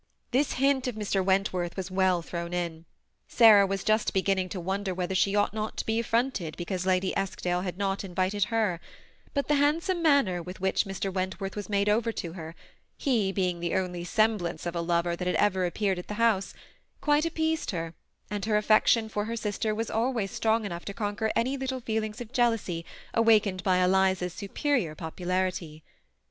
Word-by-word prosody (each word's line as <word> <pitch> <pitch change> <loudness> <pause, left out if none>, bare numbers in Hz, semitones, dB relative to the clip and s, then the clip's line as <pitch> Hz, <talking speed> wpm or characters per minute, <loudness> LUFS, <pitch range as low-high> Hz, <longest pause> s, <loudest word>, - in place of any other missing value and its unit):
This 270 +4 +2
hint 270 0 +2
of 245 - -3
Mr. 205 -3 0
Wentworth's 185 -2 0
was 185 0 -4
well 185 -2 +2
thrown 170 +1 -4
in. 170 -2 -3 0.4
Sarah 215 -4 +7
was 195 0 -2
just 215 -1 +1
beginning 190 -1 +1
to 185 - -5
wonder 190 +1 -2
whether 180 +1 -2
she 195 +2 +2
ought 205 0 +2
not 215 0 -4
to - - -2
be 225 +1 0
affronted 230 -8 -1
because 185 +1 -3
Lady 185 0 +1
Eskdale 180 -2 -1
had 180 -1 -4
not 195 0 -1
in* 180 -3 -9
Tited 190 +1 +1
her; 220 -7 0 0.6
but 280 - 0
the 295 - +2
handsome 335 +5 +1
manner 280 - +3
with 180 +2 -8
which 190 0 +1
Mr. 195 0 -3
Wentworth 190 +1 -3
was 205 0 -5
made 200 0 +1
over 225 +2 +2
to 170 -5 -5
her 165 -2 -8 0.2
— - - -44
he 220 -8 +2
being 180 -3 -1
the 170 0 -2
onlj 180 -2 -2
semblance 210 -8 +1
of 175 0 -3
a 170 - 0
loyer 170 0 0
that 180 +1 -4
had 180 - +1
ever 190 -3 +2
appeared 190 0 -1
at 180 - -8
the 210 - -5
house 225 -4 +1 0.2
— - - -42
quite 295 +1 +2
appeased 320 -1 -1
her, 165 -3 -3 0.4
and 205 -2 -2
her 215 -1 +2
affection 215 +1 +4
for 210 -1 -2
her 230 +1 -3
sister 215 0 -2
was 225 +1 -3
always 225 -4 0
strong 220 0 +1
enough 175 -3 -5
to 200 - -6
conquer 215 0 -1
any 255 +4 +1
little 265 -1 -3
feelings 220 -1 -3
of 240 0 -8
jealousy 225 -9 +1 0.3
awakened 215 -4 +3
by 185 -1 +3
Eliza's 185 -1 +2
superior 200 - -1
pop* 160 0 -7
ularity. 180 -4 -2
195 Hz, 195 wpm, -28 LUFS, 180-225 Hz, 0.6 s, Sarah